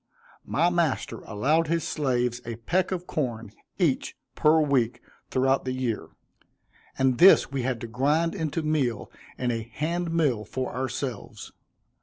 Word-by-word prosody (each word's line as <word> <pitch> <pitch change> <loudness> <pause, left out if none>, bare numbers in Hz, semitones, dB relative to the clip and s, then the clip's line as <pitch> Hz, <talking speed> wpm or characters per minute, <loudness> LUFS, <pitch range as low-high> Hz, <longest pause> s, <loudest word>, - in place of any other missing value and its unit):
My 170 +4 +2
master 170 -5 0
allowed 150 +10 +1
his 165 0 0
slaves 125 -4 0
a 115 -1 -5
peck 175 - 0
of 180 -1 -3
corn, 115 - -3 0.3
each, - - 0 0.2
per 155 +1 +4
week, 125 -6 +1 0.3
throughout 135 +1 +2
the 130 - -2
year; 125 -4 -2 0.9
and 130 -2 +2
this 185 -7 +7
we 135 -1 -1
had 125 -1 -1
to 115 - -5
grind 150 +8 +1
into 160 -3 -2
meal 135 -8 -1 0.3
in 125 -1 0
a 115 -1 -2
hand 160 +10 -3
mill 145 -10 +1
for 130 +4 -4
ourselves. 130 -2 -5
130 Hz, 145 wpm, -26 LUFS, 120-160 Hz, 0.9 s, this